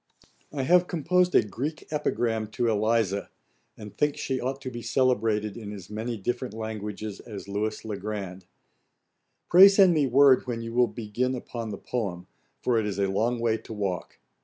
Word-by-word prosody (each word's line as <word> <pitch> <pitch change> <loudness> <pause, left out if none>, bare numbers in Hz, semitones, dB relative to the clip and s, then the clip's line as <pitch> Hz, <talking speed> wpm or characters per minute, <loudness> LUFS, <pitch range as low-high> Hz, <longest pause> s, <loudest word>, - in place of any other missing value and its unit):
I 140 -3 -2
have 180 +5 +4
composed 180 +2 +1
a - - +6
Greek 140 +9 -5
epigram 115 -7 -1
to 120 - 0
Eliza, 110 -2 +1 0.5
and 105 -1 -10
think 150 -1 0
she 130 -1 -2
ought 135 +2 -3
to 130 -2 -5
be 120 -1 -6
celebrated 115 -4 +1
in 110 -3 -7
as 100 -2 -10
many 115 +2 -3
different 120 +3 -3
languages 105 -2 -5
as 105 -4 -9
Lewis 105 +2 -3
le 105 -2 -4
Grand. 95 -3 -6 1.0
Pray 185 +3 +9
send 195 -2 +6
me 150 -4 +2
word 130 0 +5
when 115 -2 -3
you 115 0 -6
will 125 0 +4
begin 120 +3 -2
upon 115 -2 -6
the 105 - -5
poem, 95 -7 -4 0.4
for 120 -2 +2
it 105 - -1
is 100 -2 -3
a 100 - +2
long 115 +5 +1
way 115 -1 +1
to - - -10
walk. 95 -5 -4
115 Hz, 180 wpm, -27 LUFS, 105-130 Hz, 1.0 s, Pray